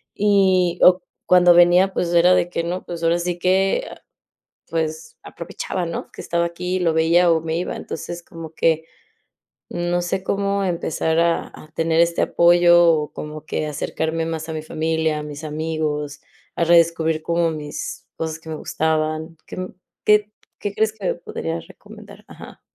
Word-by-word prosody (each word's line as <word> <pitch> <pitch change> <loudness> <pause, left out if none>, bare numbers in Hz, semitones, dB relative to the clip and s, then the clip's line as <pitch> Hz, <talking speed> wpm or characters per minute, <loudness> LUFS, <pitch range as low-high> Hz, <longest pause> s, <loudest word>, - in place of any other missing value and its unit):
y 190 -4 +3
o 180 0 +6 0.2
cuando 180 -1 +6
venía, 175 +2 +5
pues, 175 -2 -1
era 175 +1 +6
de 175 - +1
que 170 - -2
no, 175 +2 -3
pues, 170 -1 -7
ahora 165 +1 +2
sí 175 0 -2
que, 190 - +2
ah, - - -13 0.7
pues, 160 -1 -3
aprovechaba, 175 +1 -5
¿no?, 165 - -5
que - - -10
estaba 170 0 0
aquí 180 +2 -3
y - - +1
lo 165 -3 +1
veía, 170 +2 +4
o 160 - +2
me 160 0 -2
iba. 180 - -3
Entonces, 175 0 -6
como 165 -2 -10
que, 160 -1 +1 0.9
no 175 0 -1
sé 185 +2 -2
cómo 200 0 0
empezar 165 -2 0
a 170 0 +1
a 155 - -13
tener 165 0 +1
este 170 0 +2
apoyo, 175 0 +5
o 150 -2 -1
como 150 0 -8
que 155 - -2
acercarme 160 +2 -2
más 160 -1 -4
a - - -4
mi 155 - -4
familia, 160 0 -1
a - - -5
mis 150 +1 -8
amigos, 150 -1 -3 0.4
a 170 - +2
redescubrir 165 -1 +3
como 170 0 +1
mis 150 -1 -6
cosas 160 -1 -4
que 160 - -14
me 155 - -4
gustaban. 155 +1 -2
¿Qué - - -9
m 185 0 -5 0.3
qué 210 0 +3 0.3
qué 205 -1 -4
crees 220 0 +1
que 210 -3 -7
me - - +1
podrías 165 -1 -5
recomendar? 210 -1 -14
Ajá. - - -12
170 Hz, 175 wpm, -21 LUFS, 160-180 Hz, 0.9 s, o